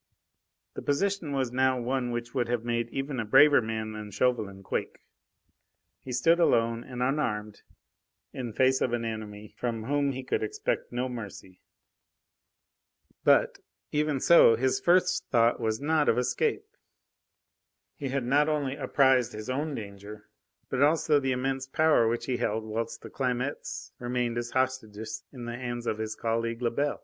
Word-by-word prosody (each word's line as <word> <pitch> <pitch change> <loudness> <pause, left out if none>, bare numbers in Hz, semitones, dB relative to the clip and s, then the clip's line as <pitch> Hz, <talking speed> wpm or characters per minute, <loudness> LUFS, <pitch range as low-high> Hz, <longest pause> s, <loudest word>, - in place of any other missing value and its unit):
The - - -6
position 185 +3 0
now 130 -1 +1
was 120 - -5
one 130 -1 -1
which 120 0 -4
would 125 -3 0
have 120 -1 -2
made 120 0 -1
even 135 0 -3
a - - 0
braver 145 +6 +6
man 110 -1 -3
than 105 -1 -7
Chauvelin 105 -3 -1
quake. - - -3 1.0
He 130 - -9
stood 165 +8 +3
alone 115 -7 +2
and 125 -1 -4
unarmed 110 -7 -2 0.7
in 125 -3 -5
face 130 +3 +2
of 120 - 0
an 120 -1 -1
enemy 105 -2 -6
from 115 -3 -3
whom 140 +2 0
he 130 0 -6
could 130 - -1
expect 425 +3 -2
no 125 +1 -1
mercy. 105 -6 -8 1.6
But, - - +4 0.3
even 150 -2 0
so, 130 -7 +7
his 130 +2 +1
first 180 +4 +3
thought 115 0 +3
was 110 -2 -1
not 150 +1 +2
of - - +3
escape. 125 - 0 1.3
He 140 - -5
had 135 -1 -1
not 145 +4 +3
only 145 -3 -1
apprised 130 -4 +3
his 110 +4 -5
own 145 +3 -2
danger, 105 0 -9 0.4
but 130 - -2
also 150 0 +4
the 135 -1 -1
immense 130 +1 -2
power 155 -4 +3
which 115 +1 -1
he 125 -2 -1
held 110 -2 -1
whilst 115 +1 -4
the - - -9
Clamettes 130 +1 -3
remained 120 -1 -1
as 120 0 -4
hostages 125 -5 -2
in 125 -3 -8
the 120 0 -4
hands 120 -1 -5
of 110 - -2
his 110 0 -3
colleague 115 +1 -2
Lebel. 140 +5 0
125 Hz, 160 wpm, -28 LUFS, 115-135 Hz, 1.6 s, so